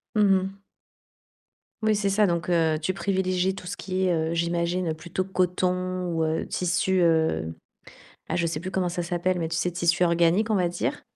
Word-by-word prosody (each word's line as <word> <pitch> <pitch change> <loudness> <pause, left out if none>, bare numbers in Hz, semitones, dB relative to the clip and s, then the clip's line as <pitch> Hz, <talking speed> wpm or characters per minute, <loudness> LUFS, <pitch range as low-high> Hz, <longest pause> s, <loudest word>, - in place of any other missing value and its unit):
Mmh 210 - +4 0.2
mh. 195 +1 -7 1.2
Oui, 215 -1 +2
c'est 200 -1 0
ça. 205 +1 +3
Donc, 170 0 -1
heu, 165 -3 +2
tu 185 +4 0
privilégies 190 -1 0
tout 185 - -9
ce 200 - -4
qui 190 0 -2
est, 180 - +2
heu, 160 0 0
j'imagine 170 0 0
plutôt 170 +4 -4
coton 185 0 0
ou, 165 -1 0
heu, 160 +1 -1
tissu, 185 +1 +1
heu, 160 - +2 0.8
bah, - - -1
je 170 -1 +1
sais 160 -2 -2
plus 185 +2 -5
comment 185 -2 0
ça 175 0 -3
s'appelle, 175 +1 -1
mais, 165 -1 -2
tu 160 - -3
sais, 180 +2 0
tissus 175 +1 +1
organiques, 170 +5 +2
on - - +3
va 180 -3 +2
dire 175 0 -3
180 Hz, 195 wpm, -25 LUFS, 170-185 Hz, 1.2 s, Mmh